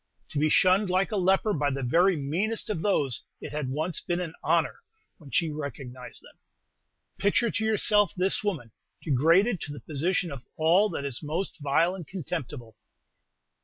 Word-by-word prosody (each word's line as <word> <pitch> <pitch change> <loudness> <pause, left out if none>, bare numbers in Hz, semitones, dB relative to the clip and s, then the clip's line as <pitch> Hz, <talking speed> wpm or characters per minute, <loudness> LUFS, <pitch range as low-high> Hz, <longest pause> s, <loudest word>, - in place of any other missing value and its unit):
To 145 - -2
be 155 +1 +3
shunned 185 +4 +4
like 185 +4 +1
a - - -1
leper 195 +2 +2
by 145 -3 +1
the 135 0 -3
very 175 +8 +3
meanest 185 +12 -1
of 175 -6 -3
those 145 - +1 0.2
it - - -7
had 150 -3 -3
once 155 +5 -2
been 175 0 -2
an 170 -3 -4
honor - - +1 0.4
when 150 -4 -13
she 165 +2 +1
recognized 135 -4 -7
them. - - -18 0.8
Picture 205 +3 +2
to 220 - -2
yourself 210 -2 +3
this 190 +3 +1
woman, 155 - -3 0.3
degraded 165 - +3
to 145 - -5
the 145 - -7
position 170 +3 -1
of 135 -3 -8
all 175 +7 +4
that 140 - -4
is 135 -4 -4
most 165 +4 -3
vile 155 +5 +2
and 180 -5 -8
contemptible. 145 - -6
165 Hz, 170 wpm, -27 LUFS, 145-190 Hz, 0.8 s, shunned